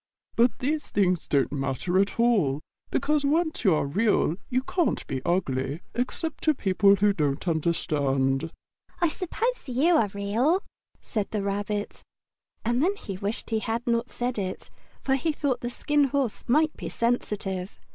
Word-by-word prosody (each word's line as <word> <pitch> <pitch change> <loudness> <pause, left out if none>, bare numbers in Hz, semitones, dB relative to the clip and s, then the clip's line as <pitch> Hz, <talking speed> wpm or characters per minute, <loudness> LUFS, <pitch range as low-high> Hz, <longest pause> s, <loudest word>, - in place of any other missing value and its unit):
But 235 -1 +3
these 295 +4 -2
things 185 -4 +1
don't 140 -2 +2
matter 140 +6 0
at 200 +3 0
all, 190 - +3 0.3
because 300 0 +1
once 315 +2 +1
you 190 -7 +5
are 150 - 0
Real 190 +1 +2
you 255 0 +1
can't 345 +4 0
be 130 -1 -3
ugly, 145 -4 -1
except 255 +6 -2
to 310 -1 +4
people 195 -2 +4
who 205 +1 +3
don't 150 -1 -1
understand." 145 -3 +1 0.5
"I 345 - +3
suppose 445 - -2
you 305 +8 +4
are 220 - +3
real?" 230 - +1 0.4
said 210 -3 -3
the 210 -2 -2
Rabbit. 205 +1 -3 0.6
And 240 +3 +2
then 380 +6 +2
he 200 - -7
wished 205 +5 -4
he 220 - +2
had 230 +2 -2
not 235 0 0
said 245 -2 -2
it, 185 -1 -5 0.3
for 270 - +1
he 275 +4 +1
thought 285 -4 -1
the 240 - -2
Skin 295 +3 +2
Horse 270 -4 -1
might 305 +5 +3
be - - -6
sensitive. 205 -5 -2
215 Hz, 160 wpm, -26 LUFS, 180-270 Hz, 0.6 s, you